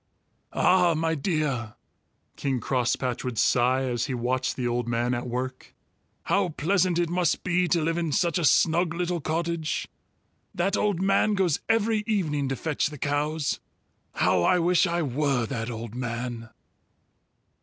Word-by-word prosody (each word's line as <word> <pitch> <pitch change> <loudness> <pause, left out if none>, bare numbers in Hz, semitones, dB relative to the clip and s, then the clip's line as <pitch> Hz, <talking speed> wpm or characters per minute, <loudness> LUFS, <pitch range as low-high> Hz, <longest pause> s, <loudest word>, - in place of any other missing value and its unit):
"Ah, 180 -2 +4
my 160 +1 0
dear!" 145 - -2 0.6
King 135 -2 -1
Crosspatch 125 +1 -1
would 125 -3 -4
sigh, 125 +4 +3
as 120 -1 -1
he 130 - -2
watched 125 +2 -1
the 125 -2 -2
old 120 0 -1
man 120 +1 0
at 120 0 -3
work. 130 +1 -5 0.5
"How 195 -2 +1
pleasant 175 +3 +1
it 175 0 +1
must 175 -2 +1
be 180 0 +1
to 170 -1 +1
live 165 +2 0
in 165 -3 -1
such 170 +3 +1
a - - -2
snug 165 +3 +3
little 175 -1 -2
cottage. 165 +1 -2 0.7
That 185 +3 +1
old 200 -3 0
man 195 +2 +3
goes 180 -5 +1
every 225 -1 +2
evening 150 -10 0
to 135 - -1
fetch 150 +3 -1
the 150 0 -8
cows. 145 +2 -1 0.6
How 90 - +2
I 135 - +4
wish 180 +1 +3
I 170 0 0
were 135 -2 0
that 115 -1 -4
old 115 -1 -6
man!" 120 -1 -4
150 Hz, 155 wpm, -26 LUFS, 125-175 Hz, 0.7 s, Ah